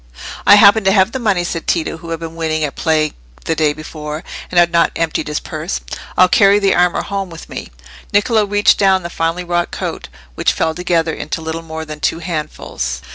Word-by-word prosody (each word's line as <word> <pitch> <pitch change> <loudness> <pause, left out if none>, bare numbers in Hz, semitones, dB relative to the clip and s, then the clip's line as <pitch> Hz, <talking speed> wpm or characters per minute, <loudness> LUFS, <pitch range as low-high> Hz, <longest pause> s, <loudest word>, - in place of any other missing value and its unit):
"I - - +10
happen 205 +1 +6
to 195 - +5
have 195 +1 +3
the 260 - -3
money," 200 -7 +1
said 170 -1 -4
Tito, 165 -1 0
who 165 +1 -11
had 165 -1 -3
been 165 0 -7
winning 160 -1 -1
at 145 - -2
play 155 -2 +1 0.3
the 165 - +1
day 155 -1 +2
before, 155 0 -7 0.3
and 180 - -4
had 170 0 +5
not 170 -1 +3
emptied 165 -2 -1
his 150 0 -2
purse. 160 +4 -4 0.4
"I'll 185 - +7
carry 200 +2 +5
the 200 -1 +2
armour 180 0 +2
home 195 -2 -4
with 165 -1 -10
me." - - -7 0.4
Niccolò 210 0 +2
reached 205 0 +3
down 190 -2 +3
the 170 - -6
finely 165 +2 -1
wrought 175 0 -1
coat, - - -5 0.3
which - - +1
fell 160 - 0
together 170 -1 0
into 155 - -4
little 160 +1 -4
more 160 -1 -7
than 150 -1 -8
two - - 0
handfuls. 150 - -4
170 Hz, 210 wpm, -17 LUFS, 160-190 Hz, 0.4 s, I